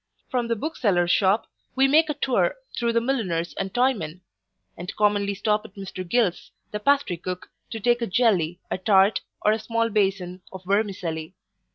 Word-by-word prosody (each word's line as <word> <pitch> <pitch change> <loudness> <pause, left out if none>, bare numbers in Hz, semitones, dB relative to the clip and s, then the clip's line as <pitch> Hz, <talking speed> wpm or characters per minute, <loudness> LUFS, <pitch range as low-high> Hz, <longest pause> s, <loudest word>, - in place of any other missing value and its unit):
From 245 -2 0
the 230 - 0
bookseller's 205 - +1
shop, 200 +3 +3 0.3
we 265 +1 +5
make 310 +3 +4
a 300 - -1
tour 285 - +1 0.2
through 235 -1 0
the 230 - +4
milliners 190 -10 -1
and 195 - -2
toymen; 200 -10 0 0.5
and 175 +2 -7
commonly 205 -1 +2
stop 210 +2 +1
at 195 - -14
Mr 195 -2 -6
Gill's, 225 -6 +1 0.2
the 210 - -3
pastry 275 -6 +2
cook, 180 +1 -6 0.2
to 225 - -5
take 240 +2 +2
a 235 - 0
jelly, 180 -6 +2
a - - -1
tart, 195 +1 +4 0.2
or 210 - +5
a 220 - +1
small 230 +1 0
bason 190 -3 0
of 190 -1 -9
vermicelli. 185 -5 -1
205 Hz, 175 wpm, -24 LUFS, 185-235 Hz, 0.5 s, we